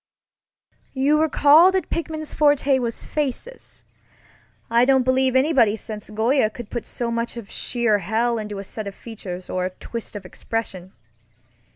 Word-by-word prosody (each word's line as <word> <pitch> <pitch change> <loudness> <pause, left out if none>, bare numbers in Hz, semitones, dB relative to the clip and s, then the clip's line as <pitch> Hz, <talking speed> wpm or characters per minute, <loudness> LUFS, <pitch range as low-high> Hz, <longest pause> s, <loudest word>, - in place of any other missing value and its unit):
You 290 +3 +3
recall 315 +3 +6
that 380 - -1
Pickman's 315 -2 -3
forte 290 -2 +3
was 235 -2 -3
faces. 300 - -5 0.8
I 235 +1 +3
don't 265 0 +4
believe 260 0 +2
anybody 260 -6 +4
since 215 -1 -8
Goya 220 +3 +2
could 220 0 -10
put 240 - -4
so 235 -1 -4
much 230 +1 -3
of 225 -4 -9
sheer 235 -4 0
hell 225 +5 0
into 210 -1 -6
a 195 - -5
set 210 +1 -6
of 200 - -7
features 185 -6 -8
or 185 - -2
a 185 - -1
twist 230 -2 -7
of 200 -2 -7
expression. 190 -1 -5
235 Hz, 155 wpm, -22 LUFS, 215-275 Hz, 0.8 s, recall